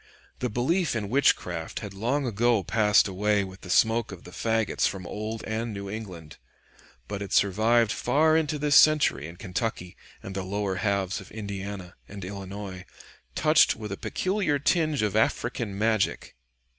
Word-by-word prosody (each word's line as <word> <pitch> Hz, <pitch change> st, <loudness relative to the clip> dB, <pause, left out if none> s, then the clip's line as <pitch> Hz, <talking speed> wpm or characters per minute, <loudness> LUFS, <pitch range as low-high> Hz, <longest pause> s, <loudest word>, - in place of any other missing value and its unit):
The -, -, -1 dB
belief 155 Hz, -, 0 dB
in 105 Hz, -3 st, -3 dB
witchcraft 140 Hz, +1 st, +1 dB
had 100 Hz, -2 st, -7 dB
long 125 Hz, +8 st, -1 dB
ago 115 Hz, -2 st, +2 dB
passed 105 Hz, +2 st, +3 dB
away 100 Hz, +1 st, +1 dB
with 95 Hz, 0 st, -10 dB
the 90 Hz, -, -11 dB
smoke 110 Hz, +4 st, +3 dB
of 95 Hz, -3 st, -10 dB
the 90 Hz, -, -12 dB
fagots 110 Hz, +3 st, 0 dB
from 95 Hz, -2 st, -5 dB
old 110 Hz, +4 st, -5 dB
and 110 Hz, 0 st, -3 dB
New 100 Hz, 0 st, -6 dB
England, 90 Hz, -8 st, -8 dB, 0.7 s
but 100 Hz, -1 st, -5 dB
it 100 Hz, -, -6 dB
survived 110 Hz, +3 st, +3 dB
far 155 Hz, +8 st, +2 dB
into 155 Hz, -1 st, +1 dB
this 145 Hz, 0 st, +1 dB
century 150 Hz, -, +5 dB
in 85 Hz, -, -10 dB
Kentucky 90 Hz, 0 st, -4 dB, 0.3 s
and 95 Hz, -, -7 dB
the 95 Hz, -, -3 dB
lower 95 Hz, 0 st, -2 dB
halves 100 Hz, -2 st, -1 dB
of -, -, -13 dB
Indiana 100 Hz, -3 st, -6 dB, 0.2 s
and 100 Hz, -2 st, -8 dB
Illinois 95 Hz, 0 st, -7 dB, 0.5 s
touched 155 Hz, 0 st, +4 dB
with 105 Hz, -2 st, -7 dB
a -, -, -2 dB
peculiar 185 Hz, -, -1 dB
tinge 155 Hz, -3 st, +1 dB
of 105 Hz, -1 st, -1 dB
African 110 Hz, -1 st, 0 dB
magic. 110 Hz, -1 st, 0 dB
105 Hz, 160 wpm, -26 LUFS, 95-120 Hz, 0.7 s, century